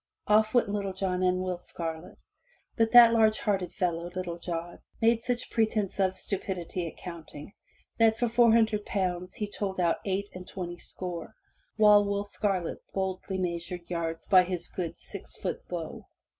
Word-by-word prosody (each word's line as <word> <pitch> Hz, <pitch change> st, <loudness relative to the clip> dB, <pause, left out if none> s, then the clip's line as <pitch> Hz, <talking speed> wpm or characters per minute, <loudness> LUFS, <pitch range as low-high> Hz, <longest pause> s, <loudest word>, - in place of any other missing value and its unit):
*' -, -, -50 dB
Off 215 Hz, +2 st, +3 dB
went 240 Hz, -, +4 dB
Little 200 Hz, -1 st, -2 dB
John 185 Hz, -1 st, -1 dB
and 185 Hz, 0 st, +2 dB
Will 185 Hz, -1 st, -2 dB
Scarlet, 165 Hz, -1 st, -6 dB, 0.6 s
but 225 Hz, -1 st, +2 dB
that 235 Hz, -1 st, +9 dB
large 220 Hz, -1 st, +4 dB
hearted 195 Hz, -5 st, -1 dB
fellow, 175 Hz, -2 st, -1 dB
Little 175 Hz, -2 st, -4 dB
John, 170 Hz, 0 st, -5 dB, 0.2 s
made 230 Hz, 0 st, +3 dB
such 245 Hz, +1 st, -2 dB
pretense 215 Hz, -3 st, 0 dB
of 190 Hz, -1 st, +2 dB
stupidity 185 Hz, -3 st, -3 dB
at -, -, -9 dB
counting, 170 Hz, -1 st, -9 dB, 0.5 s
that 225 Hz, -1 st, +5 dB
for 240 Hz, -, +1 dB
four 235 Hz, 0 st, +5 dB
hundred 220 Hz, -2 st, +3 dB
pounds 180 Hz, -2 st, -2 dB
he 210 Hz, -, -3 dB
told 200 Hz, -2 st, -4 dB
out 170 Hz, -2 st, +2 dB
eight 200 Hz, +1 st, -2 dB
and 185 Hz, 0 st, -9 dB
twenty 175 Hz, -2 st, -6 dB
score, 180 Hz, +3 st, -6 dB, 0.4 s
while 210 Hz, -1 st, +7 dB
Will 200 Hz, 0 st, -1 dB
Scarlet 195 Hz, -4 st, -2 dB
boldly 190 Hz, 0 st, -2 dB
measured 175 Hz, -1 st, -3 dB
yards 165 Hz, -1 st, -3 dB
by 185 Hz, -2 st, +7 dB
his 180 Hz, -1 st, -2 dB
good 170 Hz, -3 st, -4 dB
six -, -, -6 dB
foot -, -, -4 dB
bow. -, -, -5 dB
190 Hz, 170 wpm, -29 LUFS, 175-210 Hz, 0.6 s, that